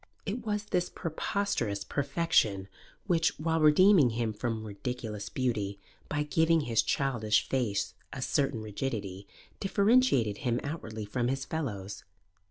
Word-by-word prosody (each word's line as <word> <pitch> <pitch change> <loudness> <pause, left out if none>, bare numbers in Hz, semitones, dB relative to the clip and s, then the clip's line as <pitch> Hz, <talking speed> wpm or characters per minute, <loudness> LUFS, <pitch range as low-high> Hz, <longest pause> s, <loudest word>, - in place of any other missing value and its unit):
It 215 +4 -3
was 210 -2 -1
this 180 -3 0
preposterous 155 - -2
perfection 135 - +1 0.4
which, 165 -4 +2
while 160 +1 +1
redeeming 155 -1 +6
him 115 -1 -1
from 110 +1 -3
ridiculous 105 0 -5
beauty 105 -6 -2 0.3
by 150 0 0
giving 160 +2 +3
his 115 -5 +2
childish 115 -6 +1
face 100 -7 -1 0.2
a 130 - -4
certain 135 -2 0
rigidity, 100 -3 -4 0.3
differentiated 200 - +3
him 120 -1 0
outwardly 110 -8 -5
from 120 +4 -1
his 135 +1 -1
fellows. 100 -11 -4
125 Hz, 125 wpm, -30 LUFS, 105-160 Hz, 0.4 s, redeeming